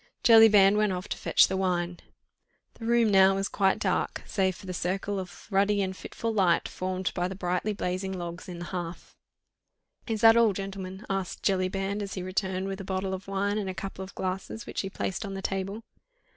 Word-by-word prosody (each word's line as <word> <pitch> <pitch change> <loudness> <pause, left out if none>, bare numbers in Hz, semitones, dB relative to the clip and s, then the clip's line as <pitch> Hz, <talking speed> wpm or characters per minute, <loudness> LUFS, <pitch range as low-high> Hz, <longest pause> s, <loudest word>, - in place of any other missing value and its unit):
Jellyband 210 -3 +7
went 210 -1 +2
off 180 +2 -5
to - - -3
fetch - - +4
the 190 - -2
wine. 180 -2 -1 0.7
The 225 - -7
room 235 -2 +4
now 195 0 +6
was 195 0 0
quite 195 -1 +2
dark, - - -1
save 190 -2 0
for - - -13
the 185 - -5
circle 195 +3 -2
of 180 -2 -9
ruddy 200 +1 +3
and 190 0 -3
fitful 230 +4 -4
light 185 -5 +3
formed 185 0 -3
by 180 0 -1
the 190 - -6
brightly 180 +2 -1
blazing 190 -1 -2
logs 175 -1 -6
in 175 - -6
the 175 - -6
hearth. 175 -1 -6 0.9
"Is 220 -2 -2
that 225 0 +8
all, 230 -3 +5
gentlemen?" 195 0 -6
asked 195 -2 -3
Jellyband, 195 +1 0
as 200 -1 -5
he 185 - -4
returned 190 0 -2
with 195 0 -4
a - - -6
bottle 190 0 -2
of 190 +1 -6
wine 200 +2 0
and 195 -2 -3
a 185 - -5
couple 195 0 -6
of 190 - -11
glasses, 190 +4 -4
which - - -3
he 195 - -4
placed 190 +1 -3
on 195 -2 -5
the 195 - -5
table. 195 +3 -3
195 Hz, 205 wpm, -28 LUFS, 185-200 Hz, 0.9 s, that